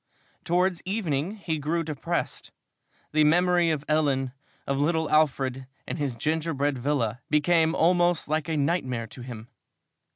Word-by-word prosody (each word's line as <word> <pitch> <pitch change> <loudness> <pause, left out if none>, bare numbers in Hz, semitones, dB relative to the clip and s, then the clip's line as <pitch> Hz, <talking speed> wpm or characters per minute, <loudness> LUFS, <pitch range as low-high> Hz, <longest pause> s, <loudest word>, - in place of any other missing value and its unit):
Towards 180 0 +1
evening 185 -3 -1
he 165 -7 -3
grew 165 +3 -1
depressed. 150 -3 -3 0.6
The 155 0 +4
memory 175 +2 +4
of 150 -2 -1
Ellen, 140 -4 +1 0.3
of 140 0 -1
little 160 +2 +1
Alfred, 135 -4 +1 0.2
and - - -5
his 140 -4 -1
gingerbread 145 0 -1
villa, 125 -3 -1
became 160 +2 +3
almost 175 0 +3
like 155 +1 -1
a 160 - 0
nightmare 135 -6 0
to 120 +3 -12
him. 120 -2 -8
155 Hz, 135 wpm, -26 LUFS, 135-170 Hz, 0.6 s, The